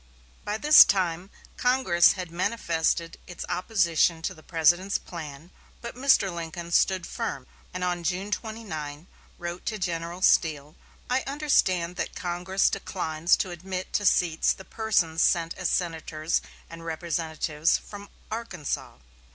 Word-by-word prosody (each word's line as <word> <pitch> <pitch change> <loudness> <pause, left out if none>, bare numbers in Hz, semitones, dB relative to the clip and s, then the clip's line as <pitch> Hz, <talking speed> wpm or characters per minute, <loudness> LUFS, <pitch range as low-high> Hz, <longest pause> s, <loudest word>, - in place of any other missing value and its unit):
By 210 +1 -2
this 300 +6 +9
time 180 -1 -1 0.3
Congress 245 -9 +4
had 180 -3 -6
manifested 170 -3 -1
its 175 - -7
opposition 175 -4 +1
to - - -2
the 155 - -16
President's 175 +4 +2
plan, 160 -1 -9 0.3
but 235 - -7
Mr. 250 -8 +3
Lincoln 170 0 -6
stood 185 0 +2
firm, 135 -5 -4 0.3
and 185 0 -4
on 175 -1 -1
June 185 +4 -2
29 175 -10 -5 0.3
wrote 175 0 -6
to 220 - -1
General 175 -1 -3
Steele: 150 -4 +2 0.3
"I 255 +1 +1
understand 185 - +1
that - - -3
Congress 180 +2 0
declines 165 -2 0
to 185 - -2
admit 185 +2 -6
to 205 - +1
seats 165 -3 +3
the 190 - -13
persons 180 -8 0
sent 165 -2 +2
as 180 - -2
senators 165 -2 -1 0.3
and 165 0 -10
representatives 160 -1 -1
from 205 -1 -11 0.2
Arkansas. 205 -10 -4
175 Hz, 135 wpm, -26 LUFS, 165-195 Hz, 0.3 s, this